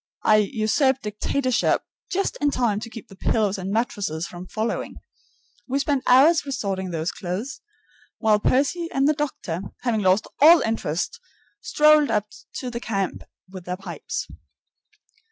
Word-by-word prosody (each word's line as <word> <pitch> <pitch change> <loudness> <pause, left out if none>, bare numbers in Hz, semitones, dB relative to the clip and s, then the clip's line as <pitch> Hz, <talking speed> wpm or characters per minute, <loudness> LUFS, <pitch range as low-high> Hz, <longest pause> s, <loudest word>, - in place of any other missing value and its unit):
I 215 - +5
usurped 245 +5 +1
dictatorship 245 +5 0 0.3
just 390 +1 -1
in 290 - +3
time 235 -7 0
to 230 - -7
keep 230 -1 -10
the 195 - -14
pillows 205 0 0
and 190 +1 -4
mattresses 200 - -1
from 180 +1 -9
following. 220 +4 -3 0.7
We 270 +1 0
spent 280 -1 0
hours 290 +6 +6
resorting 195 -9 -3
those 165 0 -2
clothes, 195 +9 -5 0.6
while 215 -2 +3
Percy 290 +9 +1
and 270 +1 +2
the 305 - +4
doctor, 275 - -3 0.2
having 230 -4 +1
lost 190 +2 +3
all 325 +4 +8
interest 220 - -2 0.4
strolled 300 -1 +4
up 210 0 -1 0.2
to 250 -2 -5
the 235 - -4
camp 195 -6 -3 0.2
with 185 -1 -10
their 180 0 -4
pipes. 190 - -5
225 Hz, 145 wpm, -23 LUFS, 195-275 Hz, 0.7 s, all